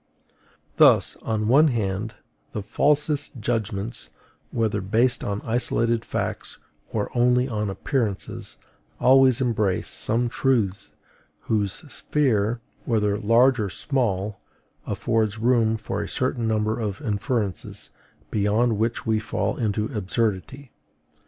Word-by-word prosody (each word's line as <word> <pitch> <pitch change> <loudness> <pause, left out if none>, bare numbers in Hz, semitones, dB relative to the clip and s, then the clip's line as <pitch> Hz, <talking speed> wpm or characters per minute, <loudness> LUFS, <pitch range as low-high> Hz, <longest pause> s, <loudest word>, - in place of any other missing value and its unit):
Thus, - - +5
on 110 -1 -2
the - - -1
one 140 +8 +6
hand, 105 -3 -2 0.4
the 105 - -3
falsest 145 +4 +1
judgments, 110 -1 -3 0.4
whether 115 -3 0
based 115 +6 +1
on 100 0 -3
isolated 115 0 +1
facts - - -4 0.3
or 105 +1 -3
only 125 +1 +3
on 105 -4 -2
appearances, 110 0 -3 0.4
always 130 -1 +5
embrace 110 -7 0
some 120 +2 -1
truths 115 -6 0 0.5
whose 105 -3 0 0.2
sphere, 115 -6 0 0.2
whether 105 -3 +1
large 120 +4 +4
or 105 -2 -1
small, 105 -6 -1 0.5
affords 110 -2 0
room 115 -1 +2
for 110 - -4
a - - -4
certain 125 -2 -1
number 110 +1 0
of 105 -3 -3
inferences, 105 - -3 0.4
beyond 110 +2 +1
which 115 +1 -1
we 110 -1 +2
fall 110 - -2
into 105 -2 -1
absurdity. 110 +5 -2
110 Hz, 115 wpm, -24 LUFS, 105-125 Hz, 0.5 s, one